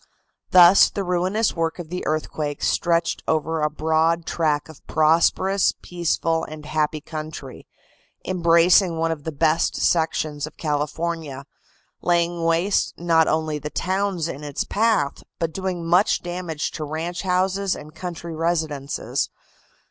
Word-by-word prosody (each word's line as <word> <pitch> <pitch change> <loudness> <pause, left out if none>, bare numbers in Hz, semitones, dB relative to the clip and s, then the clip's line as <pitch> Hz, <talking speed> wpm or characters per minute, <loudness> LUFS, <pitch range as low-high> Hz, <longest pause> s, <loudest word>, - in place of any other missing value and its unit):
Thus 180 +1 +7
the 200 - -3
ruinous 185 +5 0
work 165 -1 -1
of 175 -3 -8
the 180 +1 -4
earthquake 150 -1 -2
stretched 170 -1 +1
over 160 0 0
a 150 - +2
broad 160 +2 +1
track 150 -3 0
of 160 -3 -14
prosperous, 170 +5 +3
peaceful 165 -1 -1
and 155 -1 -8
happy 155 0 -1
country, 155 -4 -8 0.6
embracing 170 0 +4
one 165 0 0
of 150 -3 -5
the 160 - -2
best 160 +2 +1
sections 155 -3 0
of 155 - -14
California, 150 -1 -3 0.6
laying 170 -1 +1
waste 165 +4 +1
not 165 -2 +3
only 155 -1 0
the 150 +1 -5
towns 185 -1 -1
in 150 -2 -7
its 145 -2 -3
path, 220 -9 +1 0.2
but 165 -1 -2
doing 185 -3 -3
much 175 +5 +3
damage 175 -3 -4
to 155 - -5
ranch 160 +4 -4
houses 190 +1 0
and 150 +1 -11
country 170 0 -6
residences. 155 -4 -1
165 Hz, 135 wpm, -23 LUFS, 155-175 Hz, 0.6 s, Thus